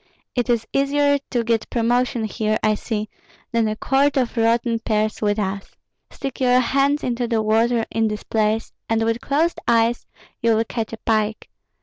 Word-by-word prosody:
It 245 0 -1
is 235 -2 +1
easier 285 +1 +2
to 240 -2 0
get 230 -1 0
promotion 240 0 +1
here, 215 0 -1
I 215 0 +3
see, 215 0 -3 0.4
than 230 -1 +2
a 215 - -1
quart 275 +5 +1
of 255 -2 0
rotten 230 0 +2
pears 215 -1 -1
with 205 -1 +1
us. 195 -1 -4 0.3
Stick 270 -2 -6
your 250 0 +4
hands 275 +4 +1
into 240 -1 -1
the 225 -2 0
water 225 +2 +2
in 225 0 +1
this 210 0 -4
place, 220 0 0 0.2
and 225 0 +2
with 230 +1 0
closed 305 +8 0
eyes 230 0 +2 0.3
you 230 -1 +3
will 225 - +2
catch 225 -1 -4
a 225 - -6
pike. 215 - -1
230 Hz, 180 wpm, -21 LUFS, 220-250 Hz, 0.4 s, your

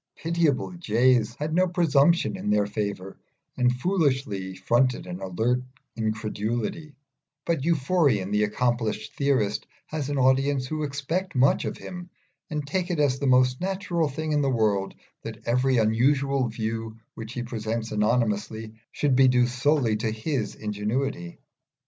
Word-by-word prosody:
The - - -21
pitiable 165 -5 +1
jays 125 - +2
had 150 +3 -3
no 185 +2 +3
presumption 170 0 +3
in 185 - -4
their 105 0 +3
favour 100 -2 -4 0.4
and 125 0 +3
foolishly 130 - -1
fronted 120 +7 +1
an 90 +1 -7
alert 110 +7 0 0.3
incredulity; 110 +6 -3 0.5
but 165 -4 0
Euphorion, 140 - +2
the 105 0 +2
accomplished 120 +1 -1
theorist, 130 -8 0 0.2
has 150 -3 -4
an 145 - -1
audience 135 +1 +2
who 155 +4 -3
expect 155 +6 -3
much 130 +2 +3
of - - -4
him, 180 -1 -8 0.4
and 150 -3 -3
take 180 +4 -2
it 175 -3 -1
as 135 -3 +2
the 140 - -1
most 125 +1 +3
natural 180 -4 -1
thing 155 +3 -4
in 150 -1 +2
the 140 - +1
world 105 -5 +1 0.3
that 110 -1 -8
every 125 +2 +2
unusual 130 +4 +2
view 110 0 -4 0.2
which 115 0 -8
he 120 - -3
presents 115 -1 -4
anonymously 110 0 0 0.2
should 145 -3 +1
be 130 0 +6
due 125 -1 +4
solely 125 -1 +1
to 110 +1 -1
his 110 +1 -2
ingenuity. 105 -2 -3
125 Hz, 150 wpm, -26 LUFS, 110-145 Hz, 0.5 s, be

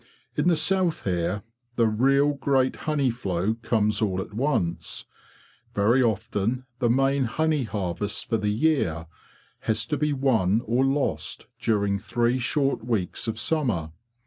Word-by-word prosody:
In - - +1
the 175 - +5
south 180 +1 +1
here 90 +2 -1 0.3
the 115 - +3
real 135 +6 +3
great 135 -2 +1
honey 140 -4 +2
flow 100 -3 -1
comes 105 -2 +1
all 95 -4 0
at 95 - -6
once: 95 - -1 0.7
very 115 +6 +4
often 115 +2 0
the 120 -3 +2
main 135 +2 +2
honey 155 +2 0
harvest 100 -1 -3
for 115 - +1
the 105 -1 -1
year 105 - +1 0.5
has 110 0 0
to 150 - -1
be 150 +1 +1
won 115 -6 +2
or 120 +4 +2
lost 135 +1 -1
during 100 -3 +1
three 120 +4 0
short 135 -1 0
weeks 115 -4 -2
of 110 -1 -2
summer. 115 - -1
115 Hz, 145 wpm, -25 LUFS, 105-135 Hz, 0.7 s, the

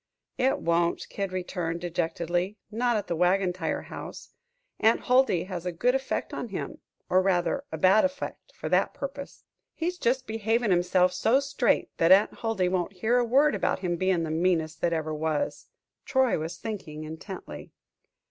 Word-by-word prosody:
"It 260 +1 +3
won't," 170 0 0
Kid 195 -2 -3
returned, 180 -2 -3
dejectedly; 175 +3 -2
"not 240 +1 +1
at 205 - -3
the 170 - -2
Wagon 180 +2 +2
Tire 175 -3 -3
House. - - -9 0.5
Aunt 225 +1 +3
Huldy 250 -9 +3
has 180 -2 -6
a 180 - -2
good 240 +9 +1
effect 270 0 -2
on - - -4
him - - -5 0.3
or 185 +1 +4
rather, 190 +9 0
bad 190 +3 +4
effect, 280 0 -4
for - - -5
that - - +2
purpose. 280 0 -7 0.3
He's 355 +2 -2
jest 255 -1 +1
behavin' 225 0 0
himself 180 +1 +3
so 225 +8 +3
straight, 280 0 0
that 165 +2 +3
Aunt 200 +3 +6
Huldy 225 -5 0
won't 180 +1 -1
hear 220 +6 +1
a - - +3
word 275 +5 +4
about 185 -2 0
him 175 -2 0
bein' 185 -1 +1
the 160 - -3
meanest 160 -1 0
that 170 - +2
ever 160 -1 -1
was." 160 - -2 0.4
Troy 265 -2 +2
was 160 +2 -5
thinking 170 -9 -6
intently. 160 +5 -8
185 Hz, 165 wpm, -27 LUFS, 170-235 Hz, 0.5 s, Aunt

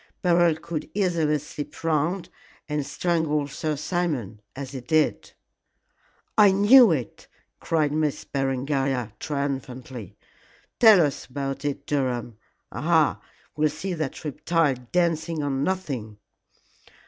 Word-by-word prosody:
Beryl 175 -2 +4
could 160 -1 -6
easily 170 -6 +1
slip 150 +1 -8
round 165 +3 0 0.4
and 150 -1 -1
strangle 155 -2 0
Sir 150 +2 -3
Simon 145 - -2
as 135 -1 -6
he 135 -2 -6
did." 155 +5 0 1.0
"I 205 -2 +7
knew 210 +3 +7
it," 130 -9 -3 0.3
cried 155 -3 +1
Miss 150 -1 -1
Berengaria, 135 -3 -1
triumphantly. 130 - -5 0.6
"Tell 215 -8 +8
us 145 - -4
all - - -20
about 135 0 -4
it, 145 -1 -3
Durham. 125 -5 -2 0.3
Aha! - - +2 0.3
we'll 150 +1 +2
see 160 +6 -4
that 155 -2 -4
reptile 155 0 +1 0.2
dancing 165 -2 0
on 135 -1 -1
nothing." 135 - -3
150 Hz, 115 wpm, -25 LUFS, 135-170 Hz, 1.0 s, Tell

